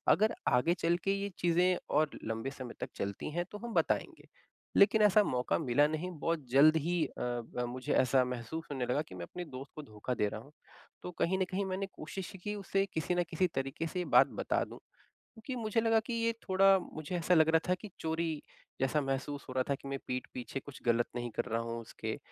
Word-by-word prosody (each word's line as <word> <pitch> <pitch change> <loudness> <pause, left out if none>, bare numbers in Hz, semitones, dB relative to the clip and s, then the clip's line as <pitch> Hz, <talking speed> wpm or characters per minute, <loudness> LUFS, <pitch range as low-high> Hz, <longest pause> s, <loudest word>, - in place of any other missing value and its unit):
अगर 215 +2 +2
आगे 125 +8 +4
चल 170 0 +1
के 195 - +2
ये 200 - -2
चीज़ें 175 +1 +3 0.2
और 155 -1 +4
लंबे 115 +4 -2
समय 130 -3 -7
तक - - -4
चलती 100 +6 -3
हैं, 175 +2 -1
तो 210 - -6
हम 235 +2 -6
बताएँगे।" - - 0 0.5
लेकिन 205 +2 +6
ऐसा 210 0 +6
मौका 125 -8 0
मिला 145 0 +3
नहीं, 155 +4 -3
बहुत 165 -2 -1
जल्द 145 +5 +7
ही 175 0 +1
अ, - - -8
ब 120 0 -2
मुझे 130 0 -2
ऐसा 130 0 +4
महसूस 125 +6 -4
होने 130 -3 -1
लगा 125 +4 +1
कि 90 - -9
मैं 90 - -6
अपने 180 - -6
दोस्त 135 -2 -9
को 155 - -5
धोखा 105 +4 -3
दे 105 - +4
रहा 110 - -6
हूँ। 140 - -16 0.5
तो 180 - -5
कहीं 190 +3 +2
न 190 - +2
कहीं 195 +1 0
मैंने 190 +1 -2
कोशिश 165 +4 -6
की, 210 0 -2
उसे 195 -1 0
किसी 160 +3 0
न 175 - +2
किसी 180 +2 +2
तरीके 135 +5 -2
से 180 - -3
ये 180 - -1
बात - - +9
बता - - +1
दूँ - - -11 0.4
क्योंकि 245 +3 -9
मुझे 220 +1 +1
लगा 225 -1 +4
कि 235 +2 -5
ये 230 0 +1 0.2
थोड़ा, 195 +1 +6
मुझे 155 0 -6
ऐसा 175 +1 +2
लग 160 -2 +6
रहा 160 - +7
था - - +5
कि 210 - -7
चोरी 160 +1 -1 0.5
जैसा 135 +3 +2
महसूस 140 +1 -3
हो - - -5
रहा 130 0 +2
था 140 - +2
कि 135 - -11
मैं 135 -1 -3
पीठ 125 0 -3
पीछे 125 +2 -4
कुछ 140 0 -11
गलत 120 0 +3
नहीं 120 0 -2
कर - - 0
रहा 115 +1 -1
हूँ, 115 0 -4
उसके। 110 - -5
155 Hz, 230 wpm, -32 LUFS, 130-185 Hz, 0.5 s, बात